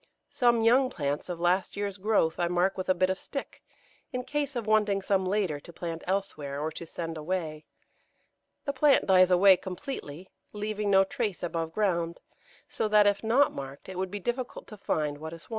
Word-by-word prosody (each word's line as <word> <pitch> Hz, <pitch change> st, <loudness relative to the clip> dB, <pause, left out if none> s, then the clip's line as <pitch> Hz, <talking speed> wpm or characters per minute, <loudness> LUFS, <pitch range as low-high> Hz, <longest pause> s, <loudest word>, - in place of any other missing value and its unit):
Some 240 Hz, -2 st, +3 dB
young 255 Hz, +3 st, +5 dB
plants 145 Hz, -, -3 dB
of 175 Hz, -2 st, -4 dB
last 180 Hz, +3 st, +1 dB
year's 200 Hz, -1 st, -3 dB
growth 200 Hz, -5 st, +1 dB
I 175 Hz, -, +2 dB
mark 180 Hz, +2 st, +1 dB
with 185 Hz, 0 st, -5 dB
a 185 Hz, -, +4 dB
bit 185 Hz, +1 st, +2 dB
of 190 Hz, -, -3 dB
stick, 275 Hz, -, -7 dB, 0.5 s
in 250 Hz, 0 st, -3 dB
case 290 Hz, 0 st, -2 dB
of 235 Hz, -3 st, -2 dB
wanting 210 Hz, -2 st, +2 dB
some 190 Hz, -1 st, +1 dB
later 185 Hz, -7 st, 0 dB
to 170 Hz, -, -13 dB
plant 165 Hz, -1 st, -6 dB
elsewhere, 155 Hz, -8 st, -2 dB
or 155 Hz, +2 st, -2 dB
to 165 Hz, +1 st, -8 dB
send 165 Hz, -1 st, -5 dB
away; 155 Hz, -1 st, -3 dB, 1.0 s
the 280 Hz, -, -1 dB
plant 285 Hz, +1 st, +4 dB
dies 185 Hz, -1 st, +6 dB
away 185 Hz, +1 st, +6 dB
completely, 185 Hz, -, -7 dB, 0.2 s
leaving 210 Hz, 0 st, -2 dB
no 195 Hz, -1 st, +6 dB
trace 210 Hz, -3 st, -3 dB
above 165 Hz, -2 st, -2 dB
ground, 170 Hz, -5 st, 0 dB, 0.5 s
so -, -, -2 dB
that 210 Hz, -1 st, +5 dB
if 205 Hz, 0 st, +2 dB
not 250 Hz, +6 st, +3 dB
marked 135 Hz, +1 st, -8 dB
it 190 Hz, -, -7 dB
would 190 Hz, 0 st, -1 dB
be 205 Hz, -, -5 dB
difficult 240 Hz, +5 st, -4 dB
to 215 Hz, -, -9 dB
find 150 Hz, -6 st, -2 dB
what 160 Hz, +1 st, -7 dB
is 165 Hz, -, -10 dB
wanted. -, -, -21 dB
190 Hz, 195 wpm, -28 LUFS, 170-215 Hz, 1.0 s, dies